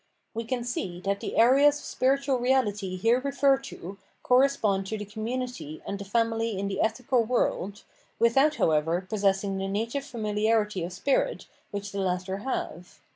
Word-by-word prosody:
We 230 +1 -4
can 245 0 -2
see 190 -7 -4
that 200 +1 -1
the - - -5
areas 275 +5 +6
of - - -11
spiritual 270 0 +1
reality 210 -7 +1
here 225 +7 +3
referred 275 0 +2
to 195 -6 -9 0.2
correspond 250 -7 +3
to 220 - -3
the 210 - -5
Community 225 - -5
and 200 - -4
the 200 - -6
Family 225 0 0
in 200 +1 -2
the 195 -1 -2
ethical 235 +2 +1
world, 215 -3 -1 0.3
without, 270 +6 +4
however, 165 - +1
possess 195 -1 +1
ing 195 -1 -2
the 195 - -2
native 225 +7 -2
fanuharity 215 -5 0
of 175 - -4
spirit 230 +10 0 0.2
which 205 0 -5
the 200 - -4
latter 185 +1 -1
have. 190 -7 -5
220 Hz, 165 wpm, -27 LUFS, 195-250 Hz, 0.3 s, areas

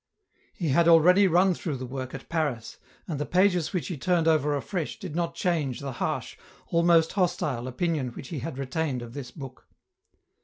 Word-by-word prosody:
He 170 -5 -2
had 170 +5 +4
already 180 +4 +6
run 180 +2 +4
through 155 -4 -4
the 130 - -5
work 130 0 -6
at - - -9
Paris, 145 -9 -2 0.3
and 155 -5 -3
the - - 0
pages 180 -3 +2
which 180 - -2
he 175 - -4
turned 170 +2 +1
over 150 -2 +3
afresh 165 +6 -3
did 185 -8 -7
not 170 -1 -1
change 160 -9 -1
the 140 -1 -5
harsh, - - -2 0.3
almost 170 -1 +4
hostile, 175 -10 0
opinion 150 +1 -1
which 130 - -9
he 155 - -4
had 130 +2 -5
retained 135 -1 -2
ot 115 0 -10
this 140 -2 -6
book. 135 -4 -11
160 Hz, 185 wpm, -27 LUFS, 135-175 Hz, 0.3 s, already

